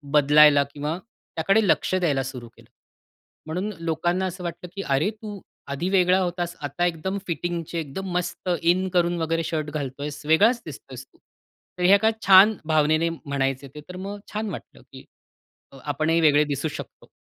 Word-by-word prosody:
बदलायला 145 0 +6
किंवा 150 +3 -3
त्याकडे 195 0 -1
लक्ष 185 - +2
द्यायला 150 -8 +1
सुरु 125 -3 -7
केलं. 115 0 -21 0.8
म्हणून 180 +7 -3
लोकांना 175 +3 -1
असं 185 0 -5
वाटलं 175 +1 -6
की, 200 - -3
"अरे 140 +2 +1
तू 215 -2 -9 0.3
आधी 160 +7 -2
वेगळा 185 -1 +4
होतास. 175 -1 -2
आता 145 +4 -1
एकदम 175 +3 -2
फिटिंगचे 170 0 -3
एकदम 165 +6 -5
मस्त 180 +1 -3
इन 175 +3 +2
करून 175 -1 +2
वगैरे 165 +1 0
शर्ट 155 -2 -3
घालतोयस, 145 0 -5
वेगळाच 210 +10 +4
दिसतोयस 135 -4 -10
तू." - - -30 0.6
तर 180 - -3
हे 185 +2 +6
एका 220 +2 +3 0.2
छान 195 +3 +8
भावनेने 155 +1 +2
म्हणायचे 140 -4 -3
ते. 150 - -8
तर 180 - -8
मग 200 +2 -6
छान 215 0 -2
वाटलं - - -9
की - - -12 0.7
अ, - - -13
आपणही 155 +3 +1
वेगळे 150 -2 +5
दिसू 145 +1 -2
शकतो. - - -9
165 Hz, 165 wpm, -24 LUFS, 150-185 Hz, 0.8 s, छान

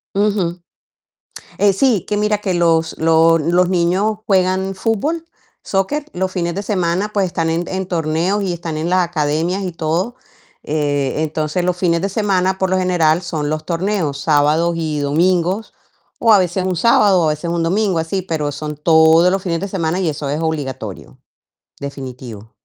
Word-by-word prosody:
Ujú. 200 -4 0 1.0
Eh, 200 -1 +4
sí, 220 -4 +2
que 210 - -1
mira, 210 0 +1
que 195 -3 -2
los 165 -2 +1
los 165 0 +4
los 175 +3 +2
niños 185 +4 +1
juegan 190 0 +1
fútbol, 260 - -1 0.4
soccer, 275 +10 -1
los 185 +1 -2
fines 170 -2 -2
de 200 - -3
semana, 190 0 -1
pues, 200 -2 +2
están 165 -2 -1
en 170 +2 -1
en 190 -1 -3
torneos, 170 +4 0
y 180 -2 -1
están 165 -2 -5
en 160 +2 -2
las 180 -1 +3
academias 165 +4 -1
y 180 - -3
todo. 170 +9 -2 0.5
Eh, 145 -3 -1
entonces, 155 +3 -2
los 180 - +1
fines 170 -2 +1
de 195 - 0
semana, 190 -2 0
por 190 -1 0
lo 190 - +1
general, 175 -3 +2
son 155 -4 -3
los 155 0 -3
torneos, 170 -4 -1
sábados 155 +3 +2
y 155 -2 -2
domingos, 175 +7 0 0.5
o 230 -2 +4
a 205 - +7
veces 180 0 0
un 185 -1 -1
sábado, 200 -4 +4
a 155 - +2
veces 155 +3 -3
un 170 -1 -1
domingo, 190 0 +1
así, 175 +4 -2
pero 155 -5 -2
son 150 +1 -6
todos 160 +2 +5
los 195 -1 0
fines 170 -3 -2
de 200 - -4
semana 180 -2 -2
y 180 - 0
eso 145 -2 -3
es 150 - -1
obligatorio, 135 - -4 0.6
definitivo. 130 -6 -8
175 Hz, 175 wpm, -18 LUFS, 160-190 Hz, 1.0 s, a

